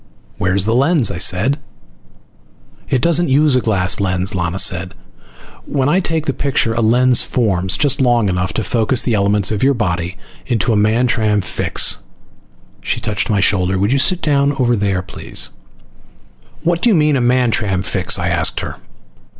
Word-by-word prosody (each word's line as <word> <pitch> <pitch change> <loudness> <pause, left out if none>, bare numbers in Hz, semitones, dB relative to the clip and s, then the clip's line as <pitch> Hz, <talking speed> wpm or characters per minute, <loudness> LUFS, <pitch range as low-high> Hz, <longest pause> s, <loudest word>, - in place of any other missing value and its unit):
"Where's 95 +1 +1
the 110 - 0
lens?" 135 - +2
I 85 - -6
said. 110 +12 +1 1.3
"It 130 -1 0
doesn't 170 -1 +2
use 145 +1 +3
a 125 - +2
glass 95 -5 +1
lens," 95 0 -1
Lana 90 -1 -2
said. 90 -1 0 0.7
"When 135 0 0
I 180 - +2
take 160 -4 -2
the 135 - -1
picture 130 -3 -1
a 115 - -1
lens 125 +2 +3
forms 95 -7 0
just 145 -2 +1
long 120 -4 +2
enough 90 0 -1
to 110 - -2
focus 115 +4 +1
the 120 - -1
elements 100 -1 +1
of 105 - -2
your 140 +1 +2
body 90 -4 -3 0.3
into 115 -2 0
a - - +1
Mantram 110 0 +1
fix." - - 0 0.8
She - - -2
touched 105 0 -3
my 105 -2 +1
shoulder. 95 -1 +1
"Would 100 +6 0
you 140 - +2
sit 175 +6 +1
down 145 -2 +1
over 125 -3 +1
there, 100 -3 -1
please?" 90 - -7 1.1
"What 170 0 0
do 240 - +3
you 215 - +3
mean 150 -2 +2
by 135 - +1
a - - -1
Mantram 115 -6 +1
fix?" 95 -2 0
I 90 - -2
asked 85 -2 0
her. - - -7
110 Hz, 175 wpm, -16 LUFS, 95-135 Hz, 1.3 s, use